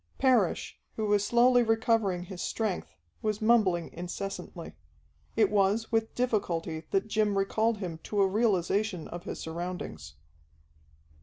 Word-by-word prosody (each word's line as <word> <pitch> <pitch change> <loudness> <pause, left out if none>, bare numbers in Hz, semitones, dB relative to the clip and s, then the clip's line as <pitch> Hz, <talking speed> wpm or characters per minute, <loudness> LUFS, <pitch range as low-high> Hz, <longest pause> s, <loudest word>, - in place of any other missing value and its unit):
Parrish, 245 -9 +2 0.2
who 220 - -1
was 205 -1 +3
slowly 245 +3 +5
recovering 225 -5 +1
his 180 0 -8
strength, 215 -5 -2 0.3
was 215 -1 -1
mumbling 215 -7 +2
incessantly. 180 +3 -6 0.6
It 215 -3 +3
was 205 +2 +2
with 225 -1 0
difficulty 170 -10 -1
that 195 +1 0
Jim 215 -2 +1
recalled 220 +3 +1
him 175 -5 -5
to 205 -1 0
a - - +4
realization 200 -3 +1
of 175 +1 -8
his - - -5
surroundings. 160 - -6
205 Hz, 130 wpm, -29 LUFS, 180-225 Hz, 0.6 s, slowly